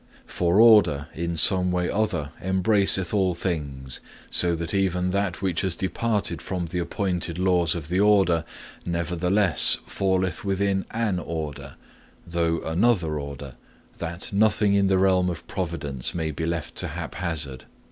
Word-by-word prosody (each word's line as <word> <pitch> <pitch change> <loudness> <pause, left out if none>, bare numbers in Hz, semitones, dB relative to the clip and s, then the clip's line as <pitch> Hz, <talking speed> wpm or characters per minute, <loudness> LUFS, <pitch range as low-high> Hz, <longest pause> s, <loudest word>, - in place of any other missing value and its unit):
For 90 +3 0
order 95 -10 +5
in 85 +1 -3
some 90 +3 +5
way 90 0 0
or 105 - 0
other 75 -9 -2
embraceth 95 -1 +2
all 95 -4 +1
things, 70 -7 -4 0.3
so 85 -1 +3
that 85 0 -5
even 90 -2 0
that 100 -1 -2
which 90 -4 0
has 95 -3 0
departed 105 +3 -2
from 90 -2 -4
the 85 +2 -4
appointed 90 -1 -2
laws 90 -3 +2
of 80 -4 -6
the 90 +3 0
order, 95 -5 +3 0.4
nevertheless 90 +2 +2
falleth 95 -3 -1
within 100 -1 0
an 110 -5 -1
order, 75 -5 -6 0.5
though 85 -1 -1
another 85 -3 +1
order, 70 -1 -8 0.4
that 85 +3 -5
nothing 105 0 +3
in 100 -1 +3
the 95 0 +2
realm 95 -1 +3
of 85 -1 -6
providence 85 -10 -4
may 80 -2 -2
be 80 +2 -4
left 85 -1 -3
to - - 0
haphazard. 80 -7 -3
90 Hz, 145 wpm, -24 LUFS, 80-95 Hz, 0.5 s, order